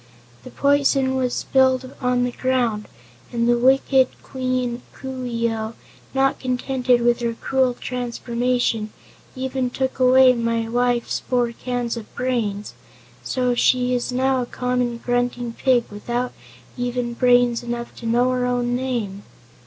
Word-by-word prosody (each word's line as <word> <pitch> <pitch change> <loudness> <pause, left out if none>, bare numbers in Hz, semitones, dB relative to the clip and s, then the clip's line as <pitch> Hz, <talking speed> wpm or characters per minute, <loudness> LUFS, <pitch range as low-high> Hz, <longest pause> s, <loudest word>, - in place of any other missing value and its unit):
The - - -9
poison 280 -2 +2
was 255 -2 0
spilled 260 -1 +2
on 250 -1 +2
the 245 - 0
ground 240 -5 0 0.4
and 235 -1 0
wicked 265 0 +4 0.2
Queen 255 -2 -2
Coo 260 -1 -6
ee 235 -1 0
oh, 220 0 -4 0.4
not 270 0 +2
content 255 0 -3
with 240 0 +3
her 235 -1 -2
cruel 260 0 +1
transformation, 245 -2 -1 0.4
even 260 -1 -2
took 265 +1 -3
away 255 0 +6
my 230 -1 -1
wife's 245 0 0
four 245 -2 0
cans 245 0 -3
of 225 - -9
brains, 230 -5 -2 0.5
so 250 -1 0
she 250 +1 +2
is 245 0 -1
now 260 +1 +1
a 245 - -4
common 250 -1 -1
grunting 245 0 -1
pig 250 -1 +2
without 240 +4 -3 0.4
even 245 -1 -2
brains 245 -1 +3
enough 240 0 -5
to 230 - -6
know 245 +2 +3
her 250 -1 0
own 245 0 0
name." 235 -6 -3
245 Hz, 135 wpm, -22 LUFS, 235-255 Hz, 0.5 s, away